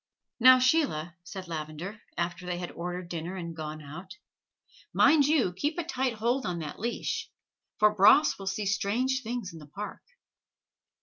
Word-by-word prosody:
"Now, 255 +2 +9
Sheila," 255 - +1
said 185 +1 -8
Lavender, 165 +6 -6 0.2
after 175 +1 -3
they 175 -1 -2
had 175 0 -5
ordered 180 +1 -5
dinner 170 +2 -5
and 170 -3 -6
gone 155 -1 -6
out, 180 - -10 0.7
"mind 295 -2 +5
you 280 - +2
keep 295 - -2
a 345 - -1
tight 265 -6 -1
hold 235 +4 0
on 180 -5 -2
that 155 -3 -6
leash, 235 +3 -3 0.5
for 210 0 +5
Bras 215 +9 +6
will 195 - -7
see 200 +2 -2
strange 225 +6 0
things 230 -6 -4
in 165 - -10
the 150 - -12
Park." 200 +8 -7
195 Hz, 165 wpm, -29 LUFS, 170-245 Hz, 0.7 s, Now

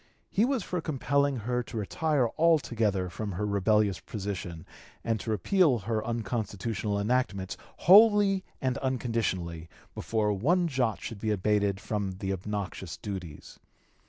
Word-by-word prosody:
He 210 - +3
was 260 -5 0
for 180 -2 -3
compelling 140 -2 +1
her 125 +1 -1
to 120 - -7
retire 120 - +1
altogether 115 - +2
from 100 +3 -5
her 105 +4 -2
rebellious 100 -1 +2
position 95 -6 -5 0.4
and 115 -2 0
to 110 - -6
repeal 130 - +3
her 110 +1 -2
unconstitutional 110 -2 -2
enactments 100 -4 0 0.2
wholly 205 -1 +6 0.2
and 130 0 -1
unconditionally, 110 -10 -2 0.2
before 105 -2 0
one 170 - +2
jot 125 -7 0
should 115 - -6
be 110 - -2
abated 100 -1 +1
from 105 -2 -3
the 95 +1 -3
obnoxious 95 -3 -5
duties. 90 -7 -7
110 Hz, 130 wpm, -29 LUFS, 100-130 Hz, 0.4 s, wholly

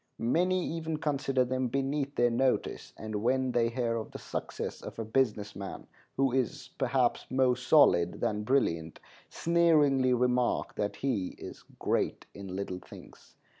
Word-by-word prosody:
Many 180 +9 +1
even 160 -1 -3
consider 135 -4 0
them 130 0 -1
beneath 140 +2 -1
their 120 0 +3
notice, 130 +2 0
and 110 -1 -4
when 130 +2 +1
they 115 -1 +2
hear 115 -1 -1
of 110 - -5
the - - -8
success - - -5
of - - -8
a 115 - -3
business 110 -3 0
man 100 -1 -7 0.3
who 135 -1 +3
is, 130 0 -2
perhaps, 130 -1 +1
more 130 -1 +3
"solid" 120 - +4
than 105 0 -1
brilliant, 85 -10 0 0.3
sneeringly 150 -7 +3
remark 125 0 +1
that 105 0 -2
he 115 -9 -2
is - - -9
"great - - -1
in 100 -1 -8
little 95 0 -4
things." - - -15
125 Hz, 150 wpm, -30 LUFS, 110-135 Hz, 0.3 s, solid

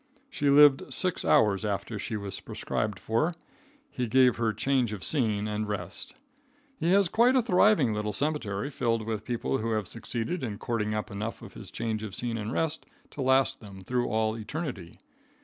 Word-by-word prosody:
She 145 - 0
lived 145 -1 +6
six 185 -2 0
hours 100 -2 +3
after 105 +1 -3
she 110 - -3
was 100 -1 -5
prescribed 105 -3 -3
for. 115 - 0 0.6
He 125 -1 -2
gave 125 +2 +4
her 115 -1 +1
change 120 +1 0
of 100 - -6
scene 110 -8 0
and 105 0 -2
rest. 95 - -5 0.6
He 170 - +1
has 200 -1 +5
quite 235 +8 +4
a 260 - +5
thriving 185 - +4
little 105 0 -2
cemetery 130 -2 -2
filled 115 -4 0
with 110 -1 -3
people 120 +3 -1
who 115 +1 -1
have 105 -3 -1
succeeded 120 - -3
in 110 -6 -4
cording 110 -2 -2
up 105 +1 -3
enough 105 +3 -5
of - - -11
his - - -10
change 110 -2 -3
of 105 -3 -6
scene 115 -2 -2
and 105 +1 -4
rest 160 +3 -2 0.2
to 145 - -6
last 135 +1 +3
them 100 -3 -11
through 120 +6 -1
all 110 0 0
eternity. 115 - -6
115 Hz, 185 wpm, -28 LUFS, 105-135 Hz, 0.6 s, lived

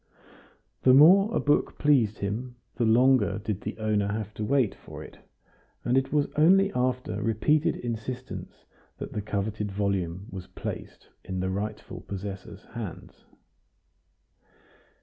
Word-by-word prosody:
The 130 0 +6
more 190 +9 +7
a - - +1
book 145 - +1
pleased 125 -8 +3
him, 115 +5 -4 0.2
the 120 - 0
longer 120 0 +4
did 105 -2 -4
the - - -5
owner 105 -2 0
have 105 0 -3
to 110 - -5
wait 130 -2 +2
for - - -10
it; - - -13 0.7
and 120 - +2
it 135 0 +1
was 150 -1 +3
only 195 +6 +5
after 125 0 -1
repeated 145 +8 +2
insistence 120 +1 -6 0.3
that - - -7
the 105 - -2
coveted 105 0 -3
volume 95 -2 -1
was 95 -1 -7
placed - - -7
in 95 0 -4
the 95 +1 -1
rightful 105 +2 -5
possessor's 100 0 -7
hands. 115 -7 -8
110 Hz, 135 wpm, -27 LUFS, 100-130 Hz, 0.7 s, more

